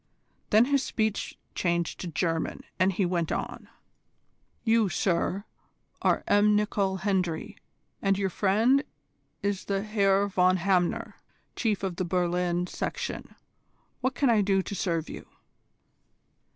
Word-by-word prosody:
Then 220 Hz, +3 st, +6 dB
his 280 Hz, 0 st, +2 dB
speech 220 Hz, -5 st, -2 dB, 0.2 s
changed 170 Hz, -1 st, -1 dB
to 180 Hz, -, -5 dB
German, 165 Hz, 0 st, -2 dB, 0.2 s
and 185 Hz, +2 st, +4 dB
he 190 Hz, +1 st, 0 dB
went 175 Hz, -2 st, -1 dB
on: -, -, -4 dB, 0.9 s
"You, 225 Hz, -3 st, +3 dB
sir, 185 Hz, +2 st, 0 dB, 0.6 s
are -, -, +2 dB
M. 205 Hz, +1 st, +4 dB
Nicol 200 Hz, -2 st, +1 dB
Hendry, 180 Hz, -5 st, -1 dB, 0.5 s
and 195 Hz, -1 st, +2 dB
your 195 Hz, -2 st, -1 dB
friend 225 Hz, +10 st, +3 dB, 0.6 s
is 200 Hz, -1 st, -1 dB
the 195 Hz, 0 st, -1 dB
Herr 200 Hz, -2 st, +2 dB
von 185 Hz, -1 st, +3 dB
Hamner, 180 Hz, -1 st, 0 dB, 0.4 s
Chief 215 Hz, -4 st, 0 dB
of 185 Hz, -3 st, -2 dB
the 185 Hz, -, 0 dB
Berlin 175 Hz, 0 st, 0 dB
Section. -, -, -5 dB, 0.6 s
What 260 Hz, 0 st, -1 dB
can 270 Hz, -1 st, +3 dB
I 220 Hz, -2 st, +4 dB
do 195 Hz, -1 st, +2 dB
to -, -, -6 dB
serve 165 Hz, -5 st, -1 dB
you?" -, -, -9 dB
195 Hz, 130 wpm, -28 LUFS, 180-210 Hz, 0.9 s, Then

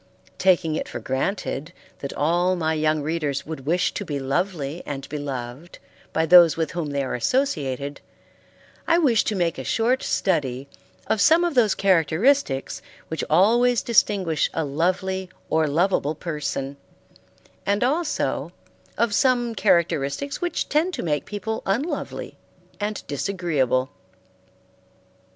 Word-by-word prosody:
Taking 175 Hz, -4 st, +3 dB
it -, -, -3 dB
for -, -, -5 dB
granted 150 Hz, +2 st, -3 dB, 0.3 s
that 140 Hz, -, -5 dB
all 175 Hz, +4 st, +1 dB
my 160 Hz, -2 st, 0 dB
young 155 Hz, -1 st, +1 dB
readers 150 Hz, -3 st, -2 dB
would 150 Hz, -3 st, -7 dB
wish 175 Hz, +3 st, +1 dB
to -, -, -4 dB
be 145 Hz, -6 st, -3 dB
lovely 155 Hz, +2 st, -2 dB
and 135 Hz, -2 st, -6 dB
beloved 140 Hz, +1 st, -6 dB, 0.3 s
by 160 Hz, -, +1 dB
those 170 Hz, -1 st, +7 dB
with 160 Hz, -2 st, -1 dB
whom 170 Hz, -3 st, -3 dB
they 140 Hz, -1 st, -1 dB
are 130 Hz, -, -3 dB
associated, 140 Hz, -, -1 dB, 0.9 s
I 335 Hz, -, +4 dB
wish 255 Hz, -10 st, +3 dB
to 215 Hz, -, -1 dB
make 170 Hz, -6 st, 0 dB
a -, -, -4 dB
short 240 Hz, -, +1 dB
study 140 Hz, -8 st, -1 dB, 0.4 s
of 215 Hz, -, 0 dB
some 330 Hz, +2 st, +5 dB
of 345 Hz, -2 st, 0 dB
those 230 Hz, -6 st, +3 dB
characteristics 185 Hz, -, +2 dB, 0.3 s
which 160 Hz, -, -3 dB
always 235 Hz, +8 st, +4 dB
distinguish 190 Hz, -8 st, +2 dB
a 160 Hz, -, 0 dB
lovely 185 Hz, +5 st, -1 dB, 0.2 s
or 160 Hz, -1 st, +3 dB
loveable 160 Hz, -1 st, +1 dB
person, 145 Hz, -4 st, -4 dB, 0.9 s
and 200 Hz, +3 st, +1 dB
also 300 Hz, +5 st, -1 dB, 0.4 s
of 235 Hz, -3 st, +1 dB
some 240 Hz, 0 st, +2 dB
characteristics 170 Hz, -, +1 dB
which 350 Hz, -2 st, -1 dB
tend 330 Hz, +5 st, +1 dB
to -, -, -4 dB
make 150 Hz, -3 st, -1 dB
people 210 Hz, +2 st, -4 dB
unlovely 245 Hz, -, -3 dB, 0.4 s
and 210 Hz, 0 st, -3 dB
disagreeable. 145 Hz, -6 st, -1 dB
170 Hz, 135 wpm, -23 LUFS, 145-210 Hz, 0.9 s, those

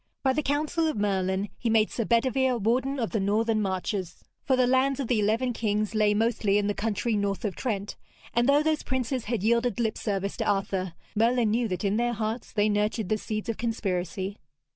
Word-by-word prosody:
By 265 Hz, -1 st, +3 dB
the 305 Hz, -, 0 dB
counsel 305 Hz, +3 st, 0 dB
of 310 Hz, -, -1 dB
Merlin 195 Hz, -1 st, 0 dB
he 235 Hz, -, -1 dB
made 220 Hz, -1 st, +3 dB
Sir 230 Hz, -, -2 dB
Bedevere 255 Hz, +2 st, +2 dB
Warden 250 Hz, +6 st, 0 dB
of 230 Hz, -, -1 dB
the 220 Hz, -, 0 dB
Northern 215 Hz, +3 st, +1 dB
Marches, 190 Hz, -1 st, -3 dB, 0.2 s
for 265 Hz, -, +2 dB
the 255 Hz, -1 st, +3 dB
lands 260 Hz, +2 st, +2 dB
of 270 Hz, -, -2 dB
the 235 Hz, -2 st, +2 dB
eleven 225 Hz, +4 st, +1 dB
kings 215 Hz, -1 st, -1 dB
lay 210 Hz, -1 st, +3 dB
mostly 215 Hz, -2 st, +2 dB
in 205 Hz, -, +1 dB
the 205 Hz, -, +1 dB
country 220 Hz, +2 st, -1 dB
north 200 Hz, +2 st, -1 dB
of 200 Hz, -, -2 dB
Trent, 205 Hz, -5 st, -3 dB, 0.4 s
and 240 Hz, +3 st, +2 dB
though 290 Hz, +2 st, +5 dB
those 310 Hz, -1 st, +1 dB
princes 260 Hz, -1 st, -2 dB
had 225 Hz, -3 st, -2 dB
yielded 235 Hz, +2 st, +2 dB
lip 220 Hz, -2 st, 0 dB
service 200 Hz, -2 st, -2 dB
to -, -, 0 dB
Arthur, 190 Hz, -3 st, -1 dB, 0.2 s
Merlin 230 Hz, 0 st, +3 dB
knew 235 Hz, +1 st, +1 dB
that 185 Hz, -2 st, -3 dB
in 200 Hz, +2 st, +1 dB
their 240 Hz, +1 st, +1 dB
hearts 220 Hz, +1 st, -3 dB
they 210 Hz, -1 st, +2 dB
nurtured 210 Hz, -1 st, 0 dB
the 215 Hz, -, +2 dB
seeds 215 Hz, 0 st, -4 dB
of 230 Hz, -, -2 dB
conspiracy. 195 Hz, -3 st, -2 dB
220 Hz, 205 wpm, -27 LUFS, 205-245 Hz, 0.4 s, though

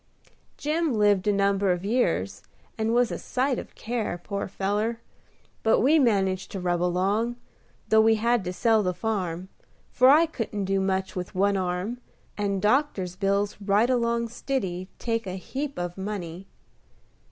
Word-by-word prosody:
Jim 305 Hz, -2 st, 0 dB
lived 205 Hz, -2 st, +3 dB
a -, -, +5 dB
number 200 Hz, -1 st, +2 dB
of 180 Hz, +1 st, -2 dB
years, 100 Hz, -, 0 dB, 0.3 s
and 220 Hz, 0 st, -1 dB
was 240 Hz, 0 st, +3 dB
a -, -, -4 dB
sight 260 Hz, 0 st, -1 dB
of -, -, -10 dB
care, 225 Hz, -5 st, -3 dB
poor 200 Hz, -1 st, -3 dB
feller; 210 Hz, +4 st, -1 dB, 0.6 s
but 225 Hz, -, +3 dB
we 300 Hz, +7 st, +5 dB
managed 195 Hz, -7 st, +1 dB
to 195 Hz, -, -4 dB
rub 175 Hz, -1 st, 0 dB
along, 195 Hz, +7 st, +1 dB, 0.5 s
though 220 Hz, 0 st, +6 dB
we 225 Hz, 0 st, +5 dB
had 235 Hz, 0 st, +1 dB
to 180 Hz, -, -3 dB
sell 220 Hz, +3 st, +3 dB
the 180 Hz, -3 st, -1 dB
farm: 185 Hz, -5 st, -2 dB, 0.4 s
for 255 Hz, +1 st, +5 dB
I 310 Hz, +4 st, +7 dB
couldn't 220 Hz, -9 st, -4 dB
do 195 Hz, 0 st, +1 dB
much 190 Hz, 0 st, -1 dB
with 180 Hz, 0 st, -5 dB
one 200 Hz, +2 st, +2 dB
arm, 185 Hz, +5 st, -2 dB, 0.4 s
and 200 Hz, -2 st, -1 dB
doctor's 210 Hz, -7 st, +1 dB
bills 200 Hz, +1 st, 0 dB
right 210 Hz, +5 st, +3 dB
along 235 Hz, -1 st, +1 dB
stiddy 195 Hz, -7 st, -3 dB
take 230 Hz, -3 st, -2 dB
a 185 Hz, -, -4 dB
heap 275 Hz, +9 st, -5 dB
of 175 Hz, +1 st, -4 dB
money. 190 Hz, -2 st, -5 dB
205 Hz, 160 wpm, -26 LUFS, 185-235 Hz, 0.6 s, I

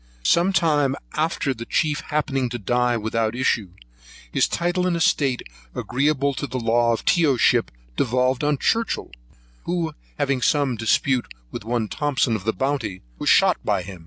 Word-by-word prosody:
Some 170 Hz, -, +3 dB
time 150 Hz, -7 st, +2 dB, 0.2 s
after 155 Hz, -3 st, 0 dB
the 115 Hz, -1 st, -8 dB
chief 150 Hz, -1 st, +1 dB
happening 135 Hz, -4 st, -1 dB
to 120 Hz, -, -4 dB
die 120 Hz, +3 st, +1 dB
without 110 Hz, +1 st, -1 dB
issue, 120 Hz, -6 st, 0 dB, 0.6 s
his -, -, +2 dB
title 175 Hz, +1 st, 0 dB
and 175 Hz, -, +1 dB
estate, 140 Hz, -6 st, +1 dB, 0.3 s
agreeable 140 Hz, +2 st, 0 dB
to 145 Hz, -, -4 dB
their 130 Hz, -, -4 dB
law 115 Hz, 0 st, +2 dB
from -, -, -9 dB
Tyoship, 145 Hz, -8 st, +3 dB, 0.3 s
devolved 125 Hz, +2 st, +1 dB
on 145 Hz, -1 st, +2 dB
Churchhill, 230 Hz, -, 0 dB, 0.5 s
who 170 Hz, -3 st, -1 dB, 0.2 s
having 140 Hz, -3 st, 0 dB
some 140 Hz, -2 st, +2 dB
dispute 120 Hz, +3 st, +1 dB, 0.2 s
with 120 Hz, -, -6 dB
one 115 Hz, 0 st, -1 dB
Thomson 135 Hz, -3 st, 0 dB
of 100 Hz, -2 st, -5 dB
the 110 Hz, -, +2 dB
Bounty, 130 Hz, -9 st, -2 dB, 0.2 s
was -, -, 0 dB
shot -, -, +5 dB
by 90 Hz, -, 0 dB
him. 95 Hz, 0 st, -9 dB
130 Hz, 160 wpm, -23 LUFS, 120-150 Hz, 0.6 s, shot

